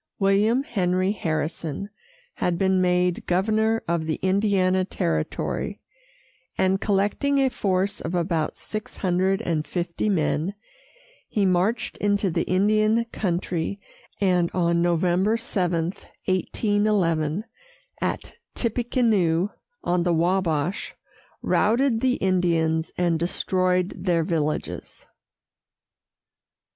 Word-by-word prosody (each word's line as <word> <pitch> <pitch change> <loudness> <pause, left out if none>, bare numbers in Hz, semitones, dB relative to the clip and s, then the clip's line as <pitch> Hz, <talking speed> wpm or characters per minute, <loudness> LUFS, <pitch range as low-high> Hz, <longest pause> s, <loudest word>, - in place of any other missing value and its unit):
William 210 +6 +3
Henry 185 - 0
Harrison 160 0 -3 0.4
had 175 -1 -1
been 190 0 +2
made 180 0 +1
governor 220 +5 +1
of 165 -1 -1
the 155 - 0
Indiana 190 -1 +2
territory, 180 -2 -2 0.8
and, 190 +1 +2
collecting 205 +8 +1
a 270 -1 +3
force 195 0 -1
of 170 +3 -3
about 170 -2 -1
six 215 0 -6
hundred 190 +2 +1
and 160 -5 -1
fifty 175 +3 -2
men, 170 0 0 0.7
he 205 -2 +1
marched 190 +5 +1
into 205 -2 +1
the - - 0
Indian 215 +4 +3
country, 180 -1 -2 0.4
and, 180 -3 +2
on 170 -1 +2
November 175 +5 +2
7, 180 -6 -1 0.3
1811, 190 -3 +1 0.6
at - - -2 0.2
Tippecanoe, 220 -7 +1 0.3
on 175 0 +1
the 175 0 +1
Wabash, 170 0 0 0.5
routed 235 +2 +2
the 255 -1 +2
Indians 170 -5 +1
and 170 -2 +1
destroyed 185 +1 0
their 170 -3 +1
villages. 155 -2 -3
185 Hz, 100 wpm, -24 LUFS, 170-205 Hz, 0.8 s, William